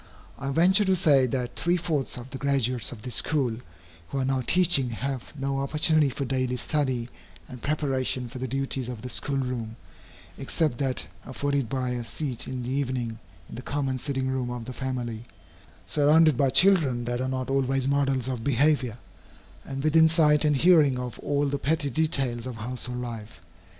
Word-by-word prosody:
I 135 - -4
venture 180 +8 +5
to 190 0 +3
say 145 -8 +4
that 125 0 -3
three 175 +4 +1
fourths 155 -7 -2
of 125 +2 -9
the 135 - -6
graduates 130 -4 0
of 110 -4 -10
this 125 - -4
school, 135 -7 0 0.5
who 140 - -4
are 135 - 0
now 135 0 0
teaching, 165 -3 +4
have 130 +2 -4
no 135 0 -1
opportunity 150 +1 +3
for 140 +1 -4
daily 130 -1 -1
study 130 -3 -1 0.4
and 125 -2 -10
preparation 135 -4 -1
for 125 +2 -9
the 130 - -3
duties 135 -1 -2
of 120 -3 -7
the 125 - -5
school 140 -1 -1
room, 125 -4 -3 0.6
except 135 -1 -1
that 135 -2 -1 0.2
afforded 140 0 -2
by 130 -1 -2
a 120 -1 -3
seat 125 0 -4
in 130 -1 -4
the 125 - -4
evening 125 -4 -2 0.3
in - - -12
the 120 - -6
common 135 -1 -2
sitting 135 -1 -2
room 130 -2 -2
of 120 -2 -5
the 130 - -7
family, 120 -4 -4 0.6
surrounded 155 +1 +4
by 135 +2 +2
children 145 -9 +4
that 120 +1 -2
are 130 - -1
not 130 0 -3
always 135 -1 +1
models 135 -3 +1
of 125 -3 -3
behavior, 135 -3 +1 0.7
and 135 0 -6
within 160 +1 +5
sight 155 -2 +3
and 150 -1 +3
hearing 150 -4 +5
of 125 -2 -6
all 145 0 0
the 140 0 -2
petty 150 -1 0
details 130 -5 0
of 125 - -6
household 125 +2 -5
life. 115 -7 -7
130 Hz, 180 wpm, -26 LUFS, 125-145 Hz, 0.7 s, venture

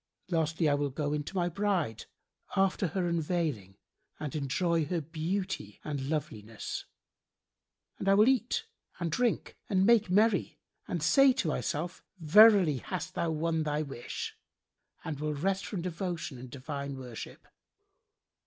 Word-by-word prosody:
Lastly 160 -1 +1
I 145 - +4
will 145 0 0
go 145 +2 -2
in 150 0 -1
to 195 - -8
my 175 -2 +2
bride, 175 - -1 0.5
after 195 0 +2
her 175 +2 -1
unveiling 155 - -1 0.4
and 150 -2 -4
enjoy 160 +3 +1
her 175 +2 -1
beauty 165 - -3
and 140 -3 -3
loveliness; 115 -8 -4 1.1
and 195 - 0
I 195 - +6
will 210 +3 +6
eat 255 -2 +2 0.3
and 170 -2 -2
drink 240 +5 0
and 190 -1 +3
make 225 -3 +5
merry 205 +1 +3 0.3
and 170 -4 -2
say 270 - +6
to 250 -9 -1
myself, 160 +3 -2 0.2
'Verily, 185 -2 +7
hast 185 +8 -5
thou 170 - -1
won 160 +1 0
thy 150 0 0
wish,' 135 -4 -6 0.7
and 150 -3 -4
will 150 0 -1
rest 190 +6 -1
from 185 -6 -4
devotion 170 -5 -4
and 125 0 -9
divine 140 +1 -5
worship. 125 -3 -9
165 Hz, 145 wpm, -30 LUFS, 145-190 Hz, 1.1 s, Verily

